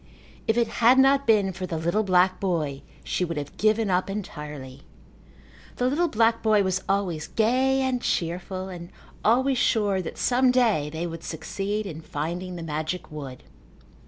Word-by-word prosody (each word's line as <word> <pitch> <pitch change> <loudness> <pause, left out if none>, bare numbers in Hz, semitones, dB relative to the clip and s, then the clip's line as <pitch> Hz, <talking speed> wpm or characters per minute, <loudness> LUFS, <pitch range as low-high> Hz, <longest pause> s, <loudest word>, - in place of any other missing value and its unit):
If 220 - +2
it 235 -1 +3
had 240 +3 +4
not 275 0 +4
been 205 -4 +3
for 185 0 -5
the 165 - -3
little 170 +6 +1
black 185 -2 +3
boy 155 -8 -1 0.2
she - - -1
would 165 -3 -3
have 145 -1 -5
given 215 -1 +2
up 180 +2 +1
entirely. 150 -9 -7 0.9
The 250 - -1
little 300 +7 +2
black 230 -3 +2
boy 215 -2 +3
was 190 0 0
always 190 -6 -1
gay 260 +4 +2
and 260 -2 0
cheerful 180 +2 -2
and 175 -2 -8 0.3
always 255 +3 +3
sure 205 -4 +2
that 170 - -7
some 255 +1 +3
day 225 - +2
they 160 +3 -4
would 165 -1 -6
succeed 200 +6 -3
in 160 -4 -7
finding 170 +5 -4
the 170 - -6
magic 155 +3 -4
wood. 140 -4 -8
190 Hz, 165 wpm, -25 LUFS, 165-225 Hz, 0.9 s, had